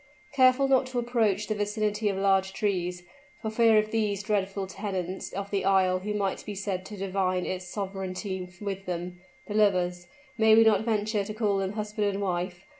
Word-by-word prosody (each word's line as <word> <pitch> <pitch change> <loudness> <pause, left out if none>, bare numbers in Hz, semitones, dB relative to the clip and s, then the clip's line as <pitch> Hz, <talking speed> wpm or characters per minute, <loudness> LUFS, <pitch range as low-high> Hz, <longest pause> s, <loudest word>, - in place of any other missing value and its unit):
Careful 260 0 +4
not 265 -1 +3
to 255 -1 -5
approach 225 -4 +1
the 215 - -1
vicinity 210 0 -1
of 195 - -2
large 195 -1 +2
trees, 180 -4 -1 0.4
for 220 - -4
fear 225 -1 +5
of 215 0 +1
these 210 -3 0
dreadful 195 -2 -1
tenants 190 -1 -4
of 200 +1 -5
the 200 -2 0
isle 190 -1 +3
who 210 +3 -3
might 200 -2 -1
be 205 - -6
said 190 -2 -3
to 210 - -8
divide 185 -1 -1
its 185 -1 -4
sovereignty 190 -1 -4
with 195 -2 -5
them, 175 0 -4 0.3
the 210 - -6
lovers 180 -4 +2 0.3
may 220 -1 +6
we 225 - +7
not 220 -1 +3
venture 215 -2 0
to 210 +2 -6
call 210 -3 +1
them 195 +1 -2
husband 210 0 -2
and 200 0 -1
wife? 180 -1 -3
200 Hz, 190 wpm, -27 LUFS, 190-215 Hz, 0.4 s, we